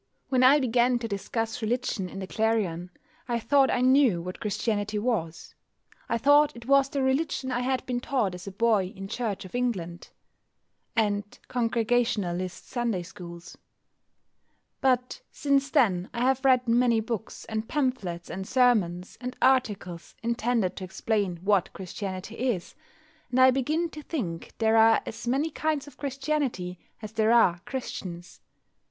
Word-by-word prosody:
When 255 -2 +2
I 270 +3 +7
began 245 -1 +2
to 235 -1 -4
discuss 225 +3 -3
religion 220 -4 -1
in - - -9
the 190 - -4
Clarion 190 -5 -1 0.4
I 240 -1 0
thought 270 +4 +3
I - - +1
knew 255 -7 +4
what 180 +2 -6
Christianity 210 0 -1
was. 205 -8 -2 0.6
I - - +1
thought 290 +4 +4
it 235 0 -11
was 275 +1 +4
the 275 -1 -1
religion 265 0 0
I 245 - 0
had 255 0 -1
been 245 -1 -1
taught 245 -7 0
as 180 +2 -9
a - - -4
boy 205 -2 +2
in 195 0 -7
Church 205 -3 -3
of 185 - -12
England 195 -9 -3 0.9
and 205 -2 0
Congregationalist 225 -7 0
Sunday 235 -7 -1
schools. 170 0 -11 1.2
But 255 - +1
since 280 -1 +1
then 185 -8 +2
I 235 - -2
have 265 +1 +2
read 255 -2 +4
many 235 0 +3
books, 220 -1 -5
and 220 0 -4
pamphlets, 220 - -2
and 190 +1 -5
sermons, 205 -9 +2
and 250 0 -5
articles 205 -10 0
intended 235 -4 0
to - - -5
explain 190 0 -1
what 200 -2 +2
Christianity 190 +2 -6
is, 240 -8 -2 0.6
and 250 +1 0
I 260 0 +8
begin 300 +6 0
to 305 - -8
think 195 - -5
there 225 0 +3
are 225 0 +5
as 225 - -7
many 280 +6 +1
kinds 305 -1 -1
of 285 -3 -14
Christianity 270 - -2 0.2
as 215 - -6
there 220 0 +2
are 185 -7 +5
Christians. 185 -9 -6
230 Hz, 150 wpm, -27 LUFS, 195-255 Hz, 1.2 s, I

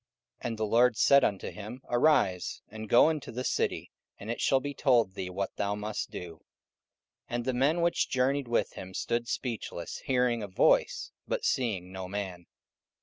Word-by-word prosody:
And 115 -2 -4
the 110 - 0
Lord 120 +2 +4
said 140 -1 +6
unto 100 -2 -1
him, 110 +5 -9
Arise, 120 - +2
and 110 0 -8
go 120 +6 +6
into 155 -3 -5
the 125 +2 -4
city, - - -1 0.3
and 105 +3 -5
it 120 - -4
shall 135 - +4
be 145 +1 -5
told 120 -8 +3
thee 95 -2 -5
what 95 +2 -4
thou 100 0 0
must 105 0 -4
do. 85 -2 -8 0.9
44:009:007 120 - -3
And 120 0 -2
the 130 - 0
men 145 +7 +2
which 170 0 +1
journeyed 135 +1 +1
with 120 - 0
him 95 0 -9
stood 120 0 -1
speechless, 115 -10 -4
hearing 125 -4 +2
a 105 - -4
voice, 95 - +2 0.2
but - - -2
seeing 100 -8 0
no 95 -1 -6
man. 95 -3 -5
115 Hz, 180 wpm, -29 LUFS, 100-130 Hz, 0.9 s, said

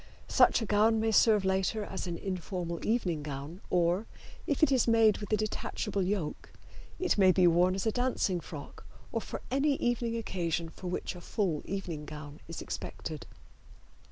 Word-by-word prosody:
Such 235 - +4
a - - -2
gown 215 +2 +3
may 220 0 +1
serve 215 -1 +5
later 190 +3 +1
as 190 -2 -5
an 170 -1 -3
informal 180 -2 -4
evening 185 -9 0
gown, 145 +4 -6
or, 180 +4 +2 0.4
if 290 +1 0
it 310 - +5
is 255 -3 +3
made 225 -2 +5
with 205 -1 -7
a 215 - +4
detachable 210 -1 -2
yoke, 185 -4 -2 0.5
it 365 - +1
may 190 -1 +7
be 185 0 +4
worn 175 +2 +4
as 195 - -2
a 220 - +3
dancing 245 -7 0
frock - - -9 0.3
or - - -1
for - - -6
any 275 +2 +2
evening 240 -2 0
occasion 170 -6 -2
for 180 - -9
which 180 - -3
a 175 - -9
full 175 -5 -1
evening 170 -6 -4
gown 150 0 -9
is 165 - -6
expected. 155 -2 -6
190 Hz, 175 wpm, -31 LUFS, 170-220 Hz, 0.5 s, may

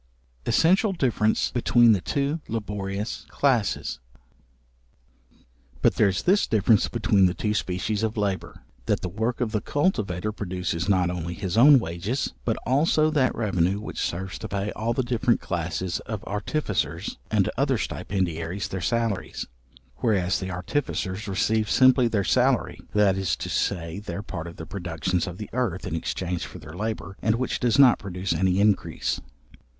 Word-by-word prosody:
Essential 190 +5 +3
difference 120 - +1
between 120 -1 +4
the 100 -4 +3
two 140 - -1
laborious 105 -1 -4
classes. 120 - 0 1.8
But - - +5
there 105 - +3
is 95 -1 -1
this 195 +3 +3
difference 110 -1 +3
between 105 -5 +3
the 90 - -2
two 105 -1 -1
species 100 +2 -1
of 110 0 -1
labour; 100 -2 -2 0.2
that - - +1
the 90 - -3
work 110 +7 -2
of 115 -3 0
the 105 -2 0
cultivator 105 - 0
produces 90 -3 -3
not 90 -3 +3
only 85 -1 -4
his 95 -2 -3
own 140 +5 +8
wages, 100 - -2
but - - 0
also 155 +4 +3
that 140 -4 +2
revenue 95 -3 +1
which 105 - -5
serves 95 +2 -3
to - - -5
pay 100 +1 -2
all 110 +2 -2
the 130 - 0
different 120 0 +1
classes 85 0 -2
of 110 -3 -4
artificers, 105 - -2
and 105 -4 +2
other 135 -1 +1
stipendiaries 90 -2 -3
their 95 - -4
salaries: 115 0 -1 0.5
whereas 95 -6 +1
the 95 - -4
artificers 95 +1 -3
receive 105 +2 +1
simply 130 0 +5
their 105 -3 0
salary, 80 - +2 0.2
that 105 -2 +4
is 95 -4 0
to - - -6
say, 85 -1 -1
their 100 -1 -6
part 85 -4 -6
of 85 - -9
the 80 - -8
productions 90 -1 -2
of 90 -1 -6
the 105 - -8
earth, 110 -7 -1
in 95 - -4
exchange 85 +1 -2
for - - -8
their 75 - -11
labour, 100 -1 -4
and 110 0 +2
which 125 +2 -2
does 120 0 +2
not 135 -4 +7
produce 95 -1 -3
any 95 0 +1
increase. 105 -1 +1
100 Hz, 160 wpm, -25 LUFS, 90-115 Hz, 1.8 s, own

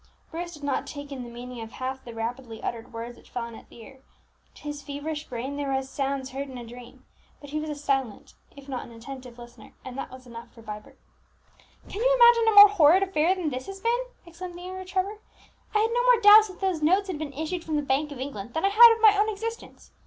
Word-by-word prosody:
Bruce 345 +1 -6
did 295 - -14
not 280 -2 -1
take 285 -1 -8
in 270 -2 -6
the 240 - -8
meaning 240 0 -8
of 225 +1 -9
half 260 +1 -5
the 240 - -9
rapidly 230 0 -5
uttered 230 -1 -5
words 235 +1 -7
which - - -20
fell 240 - -4
on 235 0 -8
his - - -13
ear, 260 +3 -14 0.6
to - - -16
his 295 -1 -5
feverish 295 +2 -5
brain 255 +3 -5
they 290 - -3
were 275 -1 -2
as 265 0 -2
sounds 270 -1 -3
heard 275 +1 -5
in 260 - -8
a 240 - -8
dream; 240 +1 -13 0.3
but 285 -1 -12
he 305 - -2
was 310 0 -5
a 300 - -3
silent 270 -6 -2 0.2
if 280 0 -13
not 260 -3 -4
an - - -13
attentive 250 +1 -10
listener, 240 0 -14
and 255 -1 -7
that 275 - -5
was 255 0 -13
enough 235 -1 -11
for 230 - -16
Vibert. 210 -1 -9 0.9
"Can 405 - -6
you - - +4
imagine 475 -2 +6
a 440 - +3
more 410 0 +11
horrid 370 -1 +5
affair 370 -1 +1
than 340 -5 -3
this 255 0 -5
has 390 0 -8
been?" 475 +4 0 0.2
exclaimed 345 +1 -9
the 355 - -10
younger 375 +1 -7
Trevor. 385 +3 -2 0.6
"I - - +6
had 450 +1 +1
no 485 0 +1
more - - +5
doubt 425 0 +8
that 375 -1 -13
those 375 -5 0
notes 375 +6 +3
had 355 -6 -4
been 300 -3 -5
issued 320 +4 -4
from 315 - -3
the 295 - 0
Bank 280 +2 0
of 285 - -7
England 240 -5 -7
than 320 - 0
I - - +4
had 460 +3 +9
of 450 - -10
my 425 -1 +8
own 415 +2 +2
existence. 455 +2 -7
290 Hz, 250 wpm, -26 LUFS, 255-375 Hz, 0.9 s, more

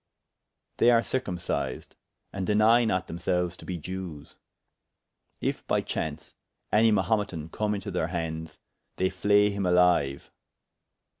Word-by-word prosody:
[FN#8] - - -55
They 120 - +5
are 115 -1 +5
circumcised, 90 -9 -3 0.4
and 95 -2 -3
deny 110 +3 +5
not 95 -4 0
themselues 90 0 -1
to - - -12
be 90 - -3
Jewes. 85 -2 -7 1.1
If - - -2
by - - +2
chaunce, 80 0 -4 0.4
any 110 +1 +5
Mahumetan 95 -6 0
come 105 -1 -1
into 100 0 -5
their 90 -3 -1
handes, 80 -2 -4 0.4
they 95 0 0
flay 105 +2 +3
him 100 0 -3
alyue. 90 -7 +2
95 Hz, 130 wpm, -27 LUFS, 85-105 Hz, 1.1 s, They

